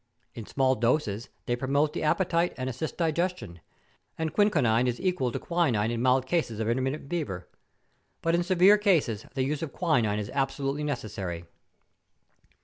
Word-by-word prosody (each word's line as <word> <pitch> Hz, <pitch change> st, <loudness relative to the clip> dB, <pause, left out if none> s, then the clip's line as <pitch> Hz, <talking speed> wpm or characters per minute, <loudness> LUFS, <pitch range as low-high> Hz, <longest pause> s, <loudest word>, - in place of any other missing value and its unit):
In 115 Hz, -3 st, -8 dB
small 130 Hz, -1 st, +2 dB
doses 120 Hz, -3 st, 0 dB, 0.2 s
they 120 Hz, -, 0 dB
promote 140 Hz, +4 st, +1 dB
the -, -, -3 dB
ap¬ 155 Hz, -, +2 dB
petite 175 Hz, -2 st, +1 dB
and 130 Hz, 0 st, -3 dB
assist 130 Hz, +5 st, -4 dB
digestion; 165 Hz, -, -1 dB, 0.6 s
and 160 Hz, -1 st, -2 dB
chinchonine 130 Hz, -, +3 dB
is 120 Hz, -1 st, -1 dB
equal 180 Hz, -10 st, 0 dB
to -, -, -3 dB
quinine 130 Hz, -11 st, 0 dB
in 115 Hz, -1 st, -2 dB
mild 130 Hz, +1 st, +3 dB
cases 130 Hz, -8 st, -1 dB
of 110 Hz, -, -1 dB
intermittent 130 Hz, +5 st, -1 dB
fever; 100 Hz, -, -4 dB, 0.8 s
but 165 Hz, -, +2 dB
in 170 Hz, -, +3 dB
severe 185 Hz, +3 st, +5 dB
cases 155 Hz, -, +1 dB
the 130 Hz, -, +1 dB
use 145 Hz, +2 st, -2 dB
of 160 Hz, -4 st, -5 dB
quinine 120 Hz, -, +1 dB
is 105 Hz, -1 st, -4 dB
absolutely 140 Hz, +1 st, -1 dB
ne¬ 145 Hz, -2 st, 0 dB
cessary. 90 Hz, -6 st, -6 dB
135 Hz, 165 wpm, -28 LUFS, 115-165 Hz, 0.8 s, severe